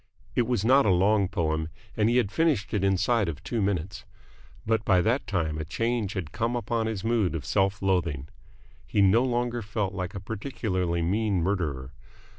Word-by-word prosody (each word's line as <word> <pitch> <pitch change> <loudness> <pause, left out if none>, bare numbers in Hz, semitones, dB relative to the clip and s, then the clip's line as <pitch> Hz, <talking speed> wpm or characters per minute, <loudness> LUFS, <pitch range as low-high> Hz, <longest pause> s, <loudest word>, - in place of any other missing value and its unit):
It 120 -3 +1
was 120 -5 0
not 135 +2 +5
a - - +5
long 100 +2 +3
poem, 80 -3 -1 0.3
and 110 +1 +2
he 120 - +3
had 105 -5 +1
finished 150 -10 +1
it 100 -2 0
inside 100 +2 +2
of 80 +1 -7
two 115 -3 -2
minutes; 100 -1 -2 0.6
but 110 0 +1
by 95 -4 +4
that 120 +8 0
time 80 -6 -1
a - - -2
change 115 +4 -1
had 85 -6 -4
come 115 +5 -1
upon 115 -2 -1
his 105 -4 -3
mood 110 -7 +1
of 75 -6 -4
self 95 +6 0
loathing. 85 -7 0 0.6
He 100 - +2
no 105 +6 +5
longer 120 -1 -1
felt 105 -2 -2
like 90 +1 -4
a - - -3
particularly 95 -5 -2
mean 100 0 +1
murderer. 75 -9 -2
100 Hz, 185 wpm, -27 LUFS, 90-115 Hz, 0.6 s, not